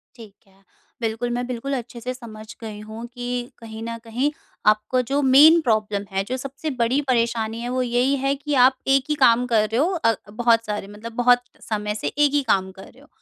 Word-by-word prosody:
ठीक 225 -5 -13
है, 195 0 -27 0.4
बिल्कुल, 225 +1 -2
मैं 245 +1 -2
बिल्कुल 255 +3 -4
अच्छे 240 0 -8
से 250 +2 -3
समझ 220 -4 -11 0.2
गई 215 -2 -7
हूँ 220 +2 -8
कि 245 0 -4
कहीं 220 -1 -9
न 230 0 -5
कहीं, 245 +6 -1 0.3
आपको 215 +4 +3
जो 285 - +2
मेन 290 +5 +7
प्रॉब्लम 215 -5 0
है, 195 0 0
जो 255 +6 -4
सबसे 275 +4 -5
बड़ी 250 +5 +2
परेशानी 230 -2 0
है 240 - -4
वो 255 +1 0
यही 250 +3 +1
है 275 +1 0
कि 295 +1 -4
आप 260 0 -2
एक 270 0 +4
ही 300 - +1
काम 245 -3 +4
कर 220 -3 +2
रहे 225 - -1
हो 330 +7 +2
अ, 230 -10 +2 0.2
बहुत 230 0 +2
सारे 210 -2 -4
मतलब 210 +3 -9
बहुत 245 0 +4 0.3
समय 210 -1 -2
से - - -3
एक 290 -1 +2
ही 290 - +3
काम 190 -1 +1
कर 190 0 -13
रहे 255 - -21
हो। 290 - -19
235 Hz, 220 wpm, -22 LUFS, 220-260 Hz, 0.4 s, मेन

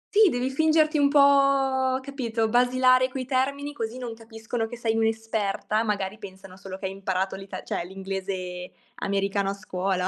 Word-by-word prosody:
Sì, 425 -2 +7
devi 250 -1 -1
fingerti 310 +1 +3
un 280 - +4
po' 275 -2 +4
capito, 245 -5 -2
basilare 255 +2 +4
coi 255 0 -5
termini 280 +3 -1
così 230 -3 -4
non 245 -2 -5
capiscono 225 0 -5
che 240 - -8
sei 225 -1 0
un'esperta, 220 -1 0
magari 205 -1 -2
pensano 190 -2 -11
solo 190 0 -8
che 190 - -7
hai 190 - -2
imparato 190 -1 -2
l'ita 195 0 -8
cioè - - -3
l'inglese 190 -1 -5 0.3
americano 195 0 0
a 195 - -1
scuola. 185 -2 -2
225 Hz, 160 wpm, -26 LUFS, 195-260 Hz, 0.3 s, Sì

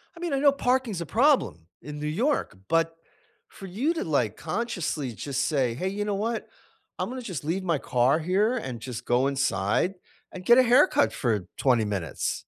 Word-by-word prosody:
I - - -12
mean, 345 -4 -3
I 275 - +1
know 285 0 +6
parking's 250 -8 0
a - - -3
problem 235 - +2
in 150 0 -8
New 150 - -3
York, 220 - 0
but 165 0 +1 0.5
for 195 - -11
you 240 - 0
to 335 - -3
like 125 - 0
consciously 160 - -3
just 140 +4 -2
say, 130 -6 +1
"Hey, 185 +10 -2
you 205 +2 -3
know 205 -1 -1
what? 225 +3 -2 0.5
I'm - - -2
gonna 255 0 -5
just 185 - -5
leave 170 +6 -2
my 170 -4 +1
car 125 +5 +2
here 200 +9 +1
and 130 - -5
just 125 -1 -6
go 125 +2 +2
inside 140 - 0 0.4
and 185 -1 -9
get 240 +1 +7
a 260 - +7
haircut 240 - +4
for 105 -7 -1
20 120 -5 +3
minutes." 95 -8 -3
165 Hz, 190 wpm, -26 LUFS, -, 0.5 s, get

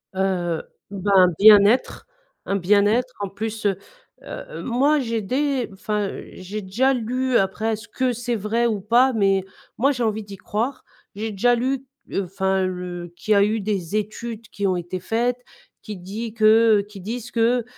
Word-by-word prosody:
Heu, 180 -3 0 0.3
bah, 200 0 -2
un 185 -1 +7
bien-être, 215 - +5 0.4
un 195 - -1
bien-être 205 +6 +2
en 200 -1 -3
plus, 215 +2 -5
heu 195 -2 +2 0.5
heu, - - -8
moi 275 +5 +2
j'ai 230 -4 -2
dé 265 +4 -1
enfin 205 +1 -2 0.2
j'ai 195 +3 -6
déjà 235 +8 +1
lu 250 +1 0
après 200 +4 0
est-ce 220 +2 -7
que 255 +3 -1
c'est 240 0 -2
vrai 225 +3 0
ou 215 -4 -1
pas? 240 +6 +4
Mais 195 -3 +2 0.3
moi 275 +5 +3
j'ai 250 -4 -2
envie 220 -1 -1
d'y 200 -1 -10
croire, 235 +9 -3 0.3
j'ai 220 +2 -3
déjà 240 +5 +2
lu, 260 +2 -1 0.4
enfin, 190 +1 0
le 180 -1 -5
qu'il 215 +5 0
y - - +4
a 200 - +5
eu 215 +2 0
des 195 -3 -2
études 215 +2 -4
qui 200 - -4
ont 185 - +1
été 175 +1 -4
faites, 240 +6 -1 0.4
qui 215 - -6
dit 205 +5 -6
que 220 -1 +5
qui 200 -2 -11
disent 235 +4 -6
que 235 +1 +2
215 Hz, 170 wpm, -22 LUFS, 195-240 Hz, 0.5 s, un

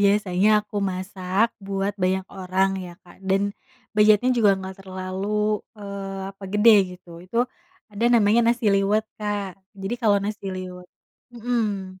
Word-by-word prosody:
biasanya 200 -1 +3 0.2
aku 205 -1 -4
masak 190 +2 -1
buat 195 0 -2
banyak 185 +1 +1
orang 190 0 0
ya, 175 -2 -9
Kak, 175 - -17
dan 195 +1 +2 0.4
budgetnya 215 +3 +5
juga 210 -5 +4
enggak 190 0 -8
terlalu, 195 +3 -2 0.2
eee, 195 -1 -6
apa 195 0 -12
gede 205 -3 +5
gitu, 170 -2 -13
itu 230 +7 0 0.5
ada 205 +3 -2
namanya 230 -1 +4
nasi 235 -3 +2
liwet, 200 +2 +2 0.2
Kak, 205 -2 -3 0.2
jadi 195 +4 -3
kalo 210 -4 +4
nasi 205 -1 -4
liwet 185 -1 -7 0.5
mhm. 210 -6 -2
195 Hz, 140 wpm, -24 LUFS, 190-210 Hz, 0.5 s, budgetnya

